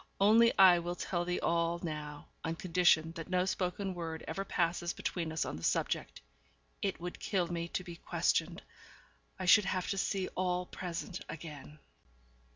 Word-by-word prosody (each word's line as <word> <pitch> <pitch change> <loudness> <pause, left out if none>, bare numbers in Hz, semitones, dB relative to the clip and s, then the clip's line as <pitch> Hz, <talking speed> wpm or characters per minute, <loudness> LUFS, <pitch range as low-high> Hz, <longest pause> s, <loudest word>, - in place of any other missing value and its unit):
Only 225 +4 +5
I 185 -2 +8
will 175 +1 -3
tell 175 -1 -2
thee 180 0 -1
all 170 0 +1
now, 150 -2 -6
on 165 0 -2
condition 165 -2 +3
that 165 0 -8
no 180 0 +2
spoken 190 +1 -2
word 165 -2 -5
ever 195 +5 -3
passes 175 -2 0
between 165 -3 -3
us 160 - -1
on - - -4
the 80 - -10
subject. - - -1 0.6
It 195 -2 -1
would 175 +1 -6
kill 190 -4 0
me 170 -1 -2
to 185 - -3
be 175 -2 -9
questioned. - - 0 0.7
I 185 - -4
should 210 +2 +7
have 185 -2 -1
to 195 - -1
see 190 -1 0
all 180 -1 -1
present 180 0 -5
again. 150 -2 -8
175 Hz, 165 wpm, -33 LUFS, 165-185 Hz, 0.7 s, I